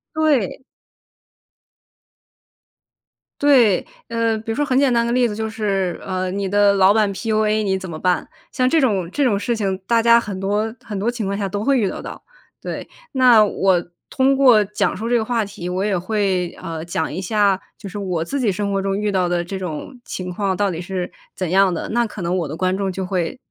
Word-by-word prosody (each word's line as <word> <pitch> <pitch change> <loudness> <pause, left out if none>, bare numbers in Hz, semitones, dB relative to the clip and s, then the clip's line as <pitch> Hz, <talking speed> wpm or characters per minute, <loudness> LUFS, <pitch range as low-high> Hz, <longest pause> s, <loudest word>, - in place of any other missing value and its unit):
对。 290 - +1 2.8
对。 250 -10 +4 0.2
呃 230 -1 0
比 225 +1 -5
如 225 - -2
说 290 - +1
很 260 -3 +1
简 270 -3 +3
单 235 0 +2
的 235 - -1
例 250 0 +3
子， 210 - -5
就 220 0 -3
是， 195 -5 -1
呃 185 -1 -2
你 200 0 -2
的 205 +1 +4
老 195 +1 +5
板 215 -2 +2
PUA 215 +1 0
你 190 -2 0
怎 190 -1 -7
么 160 -1 -6
办？ 180 -1 0 0.2
像 255 0 +1
这 325 - +3
种 195 - +1
这 290 - 0
种 220 -6 +2
事 235 +3 -1
情 195 -3 -1
大 230 -1 +3
家 235 0 +6
很 200 -5 -5
多 210 +3 -1
很 210 -3 -5
多 215 +5 0
情 235 -4 -4
况 200 +1 -2
下 200 -2 -1
都 205 +2 -3
会 275 +1 +3
遇 200 - +1
得 - - -5
到。 - - -9 0.4
对， - - -5 0.2
那 250 -5 +6
我 190 -3 +1 0.3
通 270 +1 +2
过 250 -6 +6
讲 200 -1 -1
述 225 +3 -4
这 245 - +2
个 220 - 0
话 230 -2 0
题， 180 -3 -7
我 185 +2 -1
也 200 -3 +1
会， 185 -2 0
呃 165 -3 -5
讲 160 -2 -2
一 180 +5 -4
下， 200 0 +2 0.2
就 205 - -9
是 205 +2 -6
我 180 -4 -2
自 280 +11 -3
己 230 -6 +2
生 200 +1 -2
活 195 0 0
中 195 0 -1
遇 210 -1 0
到 185 -2 +1
的 175 -1 0
这 190 +2 -5
种 180 - -6
情 180 -1 -5
况 195 -1 -1
到 200 -2 +1
底 165 +1 -5
是 180 -1 -4 0.2
怎 185 -3 -3
样 195 0 +4
的， - - -4
那 235 +1 +1
可 210 -2 -8
能 175 +2 -1
我 170 -5 -1
的 150 - -5
观 185 0 +1
众 195 -1 -1
就 190 0 -4
会 180 +4 -2
200 Hz, 240 characters per minute, -20 LUFS, 185-225 Hz, 2.8 s, 家